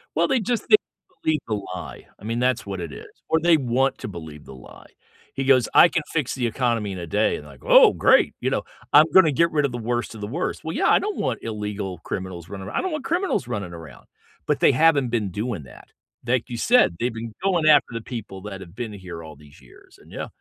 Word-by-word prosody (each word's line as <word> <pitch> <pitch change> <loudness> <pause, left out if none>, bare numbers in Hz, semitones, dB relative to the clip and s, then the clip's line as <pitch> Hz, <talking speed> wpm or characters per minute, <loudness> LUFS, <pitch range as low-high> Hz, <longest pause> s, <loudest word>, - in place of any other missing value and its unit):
Well, - - +2
they 265 -2 +2
just 235 +2 -2
they - - +9 0.5
believe 155 -2 +1
the 110 - -1 0.2
lie. 90 - -9
I - - -18
mean, 115 +2 -2
that's 125 -1 0
what 95 -2 -5
it 85 -3 -6
is. - - -10 0.2
Or 160 - +3
they 170 -1 +5
want 130 +1 0
to - - -6
believe 80 -5 -9
the 65 - -11
lie. 65 - -14 0.5
He 135 - -3
goes, 130 -4 +4
"I 175 - +8
can 165 -2 -1
fix 150 -6 -1
the 125 -2 -1
economy 115 -3 -1
in 95 - -6
a 85 - -6
day" 105 +5 +1
and, - - -11
like, - - -15
"Oh, - - +7
great." - - +4
You - - 0
know? - - -1 0.3
"I'm - - +8
gonna 185 -5 +7
get 170 +4 +2
rid 150 -2 +1
of 135 - -2
the 120 - -4
worst 120 +1 -2
of 105 - -10
the 105 - -4
worst." 155 +11 -3
Well, 160 +1 -4
yeah, - - +2
I - - +5
don't 420 -1 -3
want 130 -4 -1
illegal 105 -4 -4
criminals 90 -2 -6
running 95 -1 -7
aro - - -8
I - - 0
don't 375 - -3
want 305 -3 -4
criminals 350 - -1
running 100 -7 -4
around, 80 -3 -12 0.4
but - - +1
they - - +5
haven't 140 -3 +3
been 105 -5 -1
doing 105 -4 -4
that. 65 -2 -15 0.4
Like 125 0 0
you 120 - -5
said, 230 - +3
they've 120 0 -1
been 115 0 -7
going 175 -5 +1
after 145 -2 +6
the 115 - -4
people 105 -6 -7
that 100 -2 -7
have 90 -1 -12
been 120 -2 -5
here 90 -4 -9
all 80 - -11
these 75 -1 -18
years. 60 - -19
And - - -19
yeah. - - -5
115 Hz, 250 wpm, -23 LUFS, 95-150 Hz, 0.5 s, they